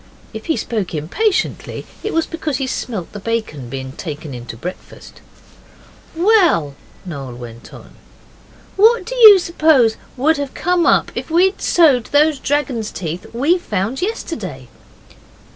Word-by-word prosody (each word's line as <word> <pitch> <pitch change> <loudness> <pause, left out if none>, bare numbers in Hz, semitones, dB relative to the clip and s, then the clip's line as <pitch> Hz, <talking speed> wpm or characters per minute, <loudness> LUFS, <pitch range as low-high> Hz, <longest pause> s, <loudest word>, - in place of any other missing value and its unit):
If 220 0 -8
he 320 - +1
spoke 210 -7 -3
impatiently 375 - -1 0.2
it 430 - -3
was 330 -1 +1
because 315 -4 -3
he 270 - -2
smelt 220 -8 -4
the 205 - -8
bacon 200 - -3
being 130 0 -6
taken 150 -1 -7
in 120 -1 -8
to 115 - -7
breakfast. 180 +10 -9 0.9
'Well,' 340 - +3 0.3
Noel 135 -8 -7
went 120 -1 -11
on, - - -13 0.8
'what 450 +4 +5
do - - -5
you 435 -5 +10
suppose 310 -10 +3 0.2
would 305 +5 +2
have 285 -1 -5
come 355 0 +1
up - - +3
if - - -5
we'd 365 +4 +2
sowed 285 -9 +4
those 295 0 +3
dragon's 260 -6 -1
teeth 170 0 -6
we 290 +10 +1
found 215 - -3
yesterday? 195 - -5
250 Hz, 145 wpm, -18 LUFS, -, 0.9 s, you